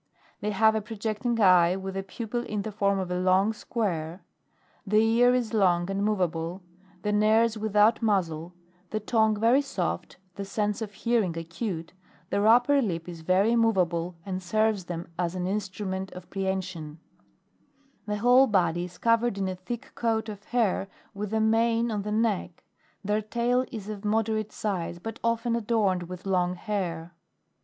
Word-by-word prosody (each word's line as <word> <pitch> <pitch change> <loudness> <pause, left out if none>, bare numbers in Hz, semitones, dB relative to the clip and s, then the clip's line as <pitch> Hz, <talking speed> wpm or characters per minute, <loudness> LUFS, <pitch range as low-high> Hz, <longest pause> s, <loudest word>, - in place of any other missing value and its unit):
They 210 - -2
have 220 +1 +4
a 220 - 0
projecting 220 +2 -2
eye 180 -3 +5
with 190 0 -5
a 195 - -1
pupil 225 +5 -4
in 210 -3 -3
the 220 - -4
form 200 -1 +1
of 185 -2 -3
a 180 - 0
long 190 +4 +3
square, 180 -7 -3 0.6
the 210 +1 +1
ear 230 +3 +4
is 240 -2 -1
long 180 -3 +2
and 195 +1 -1
moveable, 180 -3 -1 0.4
the 210 - 0
nares 215 +2 +3
without 215 +1 +3
muzzle, 175 -6 0 0.3
the 215 - -2
tongue 220 0 +2
very 235 +5 +4
soft, 185 -10 -3 0.2
the 200 - -5
sense 205 +2 -2
of 215 -2 -4
hearing 210 -5 0
acute; 165 +1 -5 0.4
their 200 +1 +2
upper 245 +5 +5
lip 170 -8 -2
is 170 -2 -8
very 190 +7 +3
moveable 180 -7 +1
and 190 -1 -3
serves 215 +1 +1
them 170 -1 -5
as 175 0 -1
an 180 -1 -2
instrument 190 -1 -3
of 180 -1 -11
prehension; 185 -5 -3 1.1
the 210 0 -1
whole 250 +5 +5
body 175 -5 +1
is 180 0 -12
covered 230 -2 +2
in 195 -1 -1
a 185 - -2
thick 235 +8 -7
coat 225 -1 -1
of 205 -1 -9
hair, 220 -5 0 0.3
with 205 0 -5
a 220 - +1
mane 230 +1 +2
on 210 -2 -1
the 210 +1 -4
neck; 210 -5 -1 0.4
their 210 +1 +1
tail 240 +4 0
is 215 -5 -6
of 210 -1 -6
moderate 215 0 0
size 180 -5 -3
but 225 +5 -7
often 230 0 +1
adorned 205 -6 0
with 180 0 -8
long 180 -2 +1
hair. 175 -4 -3
205 Hz, 165 wpm, -27 LUFS, 185-225 Hz, 1.1 s, eye